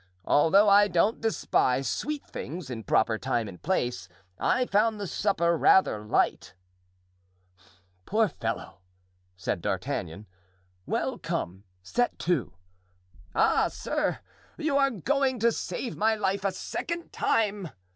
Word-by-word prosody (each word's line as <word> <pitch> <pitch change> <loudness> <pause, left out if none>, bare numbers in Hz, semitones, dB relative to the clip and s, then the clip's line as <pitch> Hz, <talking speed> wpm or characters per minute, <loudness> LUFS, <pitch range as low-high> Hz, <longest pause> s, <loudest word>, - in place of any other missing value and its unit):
Although 195 +8 +5
I 205 +1 +6
don't 195 +4 +1
despise 135 - +1
sweet 300 -1 -3
things 160 -3 -7
in 115 -3 -6
proper 110 0 +2
time 120 -4 -1
and 90 -3 -11
place, 125 - -1 0.3
I 255 - +2
found 215 0 +2
the 200 - -3
supper 170 -3 +1
rather 155 - +4
light." 105 - 0 1.5
"Poor 220 +1 +3
fellow!" 115 - -5 0.6
said 95 - -2
D'Artagnan. 85 +5 -3 0.6
"Well, - - -1
come; 95 +4 -4 0.2
set 245 - 0
to." 145 - -1 0.8
"Ah, - - +3
sir, - - -2 0.4
you 300 -2 -1
are 275 -1 +4
going 265 - 0
to 230 +1 +3
save 240 +1 -4
my 220 +1 +2
life 195 -2 -1
a 195 - +1
second 340 - -5
time!" 205 -5 0
195 Hz, 125 wpm, -27 LUFS, -, 1.5 s, I